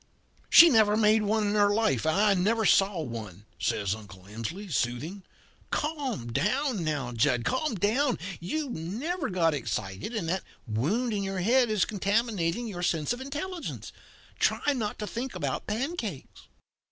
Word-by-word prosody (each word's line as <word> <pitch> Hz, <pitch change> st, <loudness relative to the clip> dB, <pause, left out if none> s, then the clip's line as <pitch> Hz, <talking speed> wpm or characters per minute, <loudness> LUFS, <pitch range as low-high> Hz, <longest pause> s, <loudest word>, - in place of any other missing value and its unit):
"'She 340 Hz, -, +10 dB
never 215 Hz, -7 st, +4 dB
made 215 Hz, 0 st, +4 dB
one 210 Hz, +1 st, +1 dB
in -, -, 0 dB
her 205 Hz, -1 st, +4 dB
life 205 Hz, -, +1 dB
and 160 Hz, -, +2 dB
I 205 Hz, +1 st, +4 dB
never 215 Hz, +4 st, +1 dB
saw 195 Hz, -3 st, +4 dB
one,' 105 Hz, -, -7 dB
says 100 Hz, -2 st, 0 dB
Uncle 100 Hz, -4 st, -11 dB
Emsley, 115 Hz, -, -6 dB
soothing. 140 Hz, +12 st, -2 dB, 0.5 s
'Calm 270 Hz, -, -3 dB
down 230 Hz, -, 0 dB
now, 145 Hz, -6 st, -2 dB
Jud 120 Hz, 0 st, +1 dB
calm 260 Hz, -1 st, 0 dB
down. 235 Hz, +8 st, +1 dB, 0.2 s
You've 205 Hz, -, -4 dB, 0.3 s
got 165 Hz, -3 st, +2 dB
excited, 110 Hz, -, -4 dB
and 180 Hz, -7 st, -2 dB
that 185 Hz, +3 st, 0 dB, 0.2 s
wound 170 Hz, -, 0 dB
in 205 Hz, -, -1 dB
your 195 Hz, -1 st, -2 dB
head 240 Hz, +5 st, +3 dB
is 215 Hz, -3 st, +2 dB
contaminating 205 Hz, -1 st, 0 dB
your 180 Hz, -5 st, -6 dB
sense 165 Hz, -2 st, 0 dB
of 245 Hz, -, -7 dB
intelligence. 310 Hz, +6 st, -5 dB, 0.5 s
Try 290 Hz, -, +2 dB
not 220 Hz, -6 st, -3 dB
to 210 Hz, -, -4 dB
think 240 Hz, +5 st, -5 dB
about -, -, -3 dB
pancakes.' 225 Hz, -, -4 dB
205 Hz, 155 wpm, -28 LUFS, 150-230 Hz, 0.5 s, She